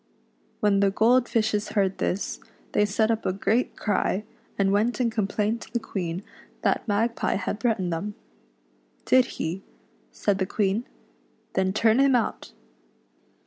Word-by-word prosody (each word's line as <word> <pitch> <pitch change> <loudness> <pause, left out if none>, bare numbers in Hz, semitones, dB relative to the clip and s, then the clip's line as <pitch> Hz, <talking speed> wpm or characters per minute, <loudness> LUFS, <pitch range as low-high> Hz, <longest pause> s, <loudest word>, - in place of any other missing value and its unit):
When 205 -2 +3
the 200 0 +4
gold 240 +5 +3
fishes 215 -2 0
heard 195 -2 +1
this, 190 - -2 0.3
they 210 - +3
set 220 +2 +2
up 225 -1 -1
a - - +1
great 215 +6 0
cry, 205 -1 0 0.3
and 195 -1 +2
went 220 +5 +1
and 240 -2 +1
complained 215 +1 -1
to - - -11
the 235 - 0
Queen 185 -4 -4 0.4
that - - +1
Mag 225 +3 +1
pie - - 0
had 205 +2 -3
threatened 195 -8 0
them. 200 +6 -4 0.5
" - - -38
Did 255 -1 +5
he 170 +4 -3 0.3
?" - - -36
said 200 -2 0
the 190 - 0
Queen; 205 +3 0 0.3
" - - -39
then 190 0 +1
turn 220 +3 +3
him 275 -1 +5
out." 235 - -1
210 Hz, 165 wpm, -26 LUFS, 195-230 Hz, 0.5 s, Did